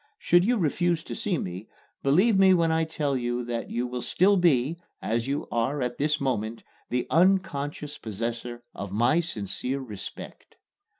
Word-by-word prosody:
Should 175 Hz, -, +4 dB
you 240 Hz, +5 st, +2 dB
refuse 170 Hz, -1 st, +1 dB
to -, -, -7 dB
see 190 Hz, -5 st, -1 dB
me, 90 Hz, -2 st, -5 dB, 0.3 s
believe 185 Hz, +11 st, +4 dB
me 190 Hz, -1 st, +6 dB
when 165 Hz, -2 st, +2 dB
I 160 Hz, 0 st, +2 dB
tell 150 Hz, -3 st, -1 dB
you 120 Hz, -1 st, -1 dB
that 120 Hz, -1 st, -3 dB
you 120 Hz, +1 st, -1 dB
will 125 Hz, 0 st, -4 dB
still 195 Hz, +9 st, +3 dB
be, 165 Hz, -4 st, +3 dB, 0.2 s
as 115 Hz, +2 st, -1 dB
you 140 Hz, +2 st, -2 dB
are 120 Hz, +5 st, 0 dB
at 125 Hz, 0 st, -3 dB
this 150 Hz, +1 st, +1 dB
moment, 115 Hz, -4 st, -2 dB, 0.3 s
the 125 Hz, 0 st, 0 dB
unconscious 150 Hz, -5 st, +1 dB
possessor 115 Hz, +2 st, -4 dB
of 100 Hz, -2 st, -6 dB
my 120 Hz, +10 st, +3 dB
sincere 125 Hz, -, -3 dB
respect. 110 Hz, -7 st, -8 dB
140 Hz, 165 wpm, -27 LUFS, 120-170 Hz, 0.3 s, me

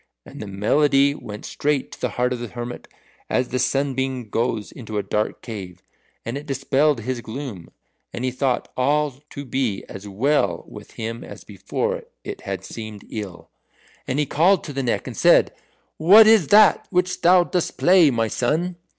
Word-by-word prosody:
And -, -, -10 dB
the 105 Hz, -, -6 dB
melody 140 Hz, +8 st, +3 dB
went 105 Hz, -7 st, -9 dB
straight 145 Hz, -2 st, -1 dB
to -, -, -12 dB
the -, -, 0 dB
heart 125 Hz, +1 st, 0 dB
of 125 Hz, -, -5 dB
the 120 Hz, -, -5 dB
hermit 120 Hz, +2 st, -7 dB, 0.4 s
as 125 Hz, -1 st, -1 dB
a 130 Hz, -, +1 dB
sunbeam 130 Hz, -2 st, -1 dB
goes 115 Hz, -3 st, -1 dB
into 110 Hz, -4 st, -7 dB
a 105 Hz, -, 0 dB
dark 105 Hz, 0 st, -2 dB
cave, 95 Hz, -6 st, -8 dB, 0.4 s
and 120 Hz, +5 st, -3 dB
it 150 Hz, -, -13 dB
dispelled 135 Hz, 0 st, +1 dB
his 125 Hz, +1 st, -3 dB
gloom, 115 Hz, -, -7 dB, 0.4 s
and 125 Hz, -, -4 dB
he 130 Hz, -, 0 dB
thought 130 Hz, -1 st, -1 dB
all 145 Hz, +3 st, +1 dB, 0.2 s
to 140 Hz, -1 st, -8 dB
be 125 Hz, -6 st, -2 dB
as 95 Hz, +1 st, -9 dB
well 100 Hz, -, 0 dB
with -, -, -12 dB
him 115 Hz, +1 st, -5 dB
as -, -, -11 dB
before -, -, -3 dB, 0.2 s
it -, -, -7 dB
had -, -, -5 dB
seemed 110 Hz, -3 st, -8 dB
ill. 100 Hz, -5 st, -7 dB, 0.6 s
And 130 Hz, -, -1 dB
he 150 Hz, -, +2 dB
called 175 Hz, +7 st, +3 dB
to 145 Hz, -, -7 dB
the 135 Hz, -, -2 dB
Neck 125 Hz, -3 st, -1 dB
and -, -, -7 dB
said, -, -, +4 dB, 0.4 s
"What 200 Hz, +7 st, +8 dB
is 215 Hz, -8 st, +5 dB
that 210 Hz, -1 st, +5 dB
which 180 Hz, 0 st, 0 dB
thou 180 Hz, +1 st, +6 dB
dost 175 Hz, -1 st, -2 dB
play, 180 Hz, -4 st, +5 dB
my 115 Hz, -3 st, 0 dB
son?" 160 Hz, +10 st, -1 dB
130 Hz, 180 wpm, -22 LUFS, 115-150 Hz, 0.6 s, What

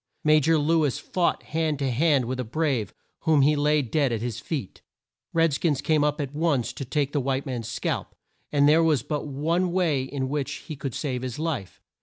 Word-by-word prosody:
Ma 155 Hz, 0 st, +5 dB
jor 160 Hz, +2 st, +3 dB
Lew 160 Hz, +2 st, +2 dB
is 140 Hz, -5 st, 0 dB
fought 175 Hz, -2 st, -1 dB
hand 155 Hz, -1 st, -1 dB
to 135 Hz, -2 st, -1 dB
hand 140 Hz, 0 st, +3 dB
with 130 Hz, +2 st, -3 dB
a -, -, 0 dB
"brave" 125 Hz, -, -1 dB, 0.3 s
whom 155 Hz, -4 st, +3 dB
he 150 Hz, +2 st, +4 dB
laid 150 Hz, -4 st, +1 dB
dead 145 Hz, -5 st, +2 dB
at 115 Hz, -, -1 dB
his 120 Hz, 0 st, -4 dB
feet. 135 Hz, -, -5 dB, 0.5 s
Red 165 Hz, -2 st, +3 dB
skins 145 Hz, -1 st, +1 dB
came 155 Hz, -2 st, +2 dB
up 150 Hz, +1 st, 0 dB
at 140 Hz, -1 st, -3 dB
once 145 Hz, -6 st, 0 dB
to -, -, -5 dB
take 145 Hz, +2 st, -1 dB
the 145 Hz, -, 0 dB
white 135 Hz, +1 st, -1 dB
man's 120 Hz, -4 st, -4 dB
scalp, 120 Hz, -, -3 dB, 0.4 s
and 145 Hz, -1 st, +4 dB
there 155 Hz, +2 st, +6 dB
was 155 Hz, -7 st, +2 dB
but 150 Hz, -1 st, -3 dB
one 165 Hz, +6 st, 0 dB
way 170 Hz, -7 st, +1 dB
in 130 Hz, 0 st, -3 dB
which 145 Hz, 0 st, -2 dB
he 155 Hz, -, -5 dB
could 135 Hz, -3 st, -5 dB
save 130 Hz, -5 st, -2 dB
his 125 Hz, -2 st, -5 dB
life. 150 Hz, -, -3 dB
145 Hz, 215 wpm, -25 LUFS, 130-155 Hz, 0.5 s, there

